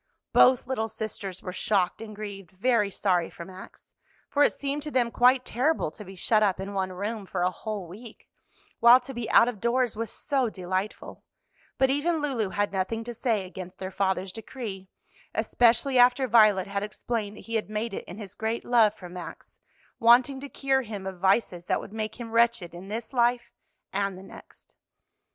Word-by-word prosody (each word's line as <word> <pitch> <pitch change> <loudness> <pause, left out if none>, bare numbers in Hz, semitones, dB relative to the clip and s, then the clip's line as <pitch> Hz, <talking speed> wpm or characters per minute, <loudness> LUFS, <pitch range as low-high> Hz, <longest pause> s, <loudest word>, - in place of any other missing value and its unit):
Both 255 -1 +6
little 240 -4 -1
sisters 200 -4 -6
were 180 - -5
shocked 200 -3 0
and 215 -1 -8
grieved, 200 -4 -7
very 210 +2 +1
sorry 180 -3 0
for 170 - -9
Max, 185 +1 -13 0.4
for 290 - +1
it - - +4
seemed 285 +1 -3
to 300 - -5
them 245 -4 +1
quite 250 +2 +4
terrible 260 - 0
to 210 - -11
be 190 0 -11
shut 215 +3 +2
up 195 -3 +2
in 195 +1 -5
one 190 -1 -1
room 200 +2 -4
for 175 - -2
a 180 - +2
whole 205 +1 -5
week, 215 +7 -12 0.5
while 240 +2 +8
to 265 +1 -9
be 240 -2 -4
out 230 - +6
of 240 -5 -4
doors 240 0 +1
was 225 0 -3
so 270 -2 -1
delightful; 190 +1 -4 0.5
but 265 0 +3
even 315 +4 +1
Lulu 265 -9 -1
had 205 +1 -1
nothing 195 +4 -1
to 240 +1 -6
say 225 -4 0
against 185 0 -9
their 190 0 -6
father's 190 -1 -1
decree, 210 -3 -7 0.5
especially 245 +2 +3
after 250 +2 +5
Violet 215 -5 +5
had 200 0 -3
explained 210 0 -4
that - - -10
he 230 - -9
had 220 -2 -1
made 215 +1 -3
it - - -4
in 180 - -9
his 205 -4 -8
great 225 +1 -3
love 225 -3 +4
for 180 - -10
Max, 175 0 -10 0.4
wanting 250 +3 +5
to 280 +1 -8
cure 270 -1 +1
him 210 -5 -7
of 190 -2 -6
vices 190 -2 +1
that - - +1
would 205 - -10
make 220 +1 -4
him 230 -2 -7
wretched 230 -7 +2
in 175 +2 -9
this 225 +4 -5
life 240 -1 +1 0.4
and 195 -1 -1
the 190 - -11
next. - - -15
215 Hz, 195 wpm, -27 LUFS, 190-240 Hz, 0.5 s, while